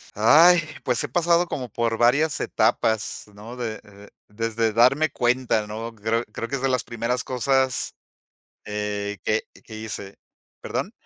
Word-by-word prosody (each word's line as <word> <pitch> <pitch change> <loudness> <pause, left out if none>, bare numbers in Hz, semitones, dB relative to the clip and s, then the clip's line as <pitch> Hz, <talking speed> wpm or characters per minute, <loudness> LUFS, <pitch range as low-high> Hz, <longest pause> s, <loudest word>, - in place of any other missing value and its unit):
Ay, 160 - +7 0.2
pues, 125 -1 0
he - - -2
pasado 175 0 +2
como 125 -7 -4
por 115 0 -1
varias 140 +6 +3
etapas, 110 -2 0
¿no? 110 +4 -10
De 115 -4 -4
de 100 0 -15 0.2
desde 115 +1 -1
darme 130 +7 +4
cuenta, 120 -3 +1
¿no? 115 +2 -6
Creo 110 +2 -1
creo 115 - -5
que 140 - -3
es 135 - -4
de 135 - +1
las 125 -2 0
primeras 120 +2 -2
cosas, 130 0 0 0.7
eh, 105 -1 -3
que 110 +1 +1 0.2
que 110 - -10
hice, 110 -3 -7 0.5
perdón - - -3
115 Hz, 150 wpm, -24 LUFS, 110-130 Hz, 0.7 s, Ay